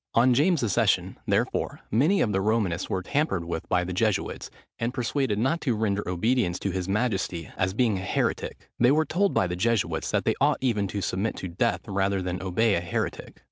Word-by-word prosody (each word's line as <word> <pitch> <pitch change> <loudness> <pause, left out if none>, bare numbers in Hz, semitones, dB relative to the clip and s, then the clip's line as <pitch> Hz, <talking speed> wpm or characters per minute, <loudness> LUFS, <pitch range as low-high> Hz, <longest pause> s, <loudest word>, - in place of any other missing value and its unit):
On 125 +2 +5
James's 145 - +2
accession, - - +1
therefore, - - 0
many 150 - +3
of 105 - +2
the 95 -1 +1
Romanists 100 -4 0
were 95 -1 -1
tampered 140 - 0
with 85 -1 -5
by 90 0 +2
the 90 +1 -4
Jesuits, 105 +1 -1 0.3
and 120 +2 -2
persuaded 125 -3 0
not 135 +10 +1
to 125 -5 0
render 105 -2 0
obedience 90 0 +1
to 100 - -2
his 95 0 -3
majesty, 95 -6 -1
as 95 +1 -1
being 110 -5 +2
a - - -6
heretic. - - -2
They 120 - +5
were 155 +3 +3
told 195 +5 +1
by - - +3
the 90 -1 -2
Jesuits 95 -5 0
that - - 0
they - - +3
ought - - +4
even 110 -6 0
to 100 +1 -4
submit 95 +4 -1
to 95 - -5
death 90 0 0
rather 100 0 0
than 90 0 -3
obey 100 +4 +2
a 85 - +1
heretic. 85 - -4
105 Hz, 205 wpm, -26 LUFS, 90-120 Hz, 0.3 s, On